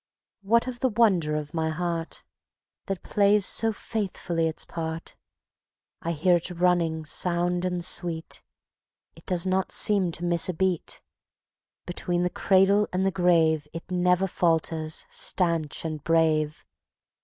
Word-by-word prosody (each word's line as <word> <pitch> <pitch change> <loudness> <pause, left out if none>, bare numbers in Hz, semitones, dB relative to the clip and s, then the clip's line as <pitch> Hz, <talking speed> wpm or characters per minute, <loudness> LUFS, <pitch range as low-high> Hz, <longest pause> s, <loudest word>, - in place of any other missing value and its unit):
What 230 +4 +2
of 250 -1 -6
the 260 - +1
wonder 195 -9 +2
of 150 -1 -5
my 160 -1 -1
Heart, 170 0 -4 0.6
That 195 -2 -4
plays 205 -1 +2
so 225 +3 +3
faithfully 185 -6 -3
its 160 - -5
part? 160 0 -6 0.9
I 170 - -2
hear 175 +3 +3
it 170 - -1
running 170 -3 0
sound 175 +2 0
and 180 -1 -1
sweet; 165 -3 -1 0.7
It - - -19
does 180 -2 +2
not 190 0 0
seem 195 -4 +3
to 175 - -2
miss 170 0 +3
a 180 - -2
beat; 185 -1 -1 0.8
Between 175 0 -2
the 180 - -1
cradle 195 +3 +3
and 185 +1 0
the 195 - +2
grave 165 -5 +2
It 165 +2 -9
never 180 +1 +2
falters, 160 -3 0
stanch 165 -5 0
and 155 -2 -5
brave. 155 -2 +1
175 Hz, 140 wpm, -26 LUFS, 160-190 Hz, 0.9 s, so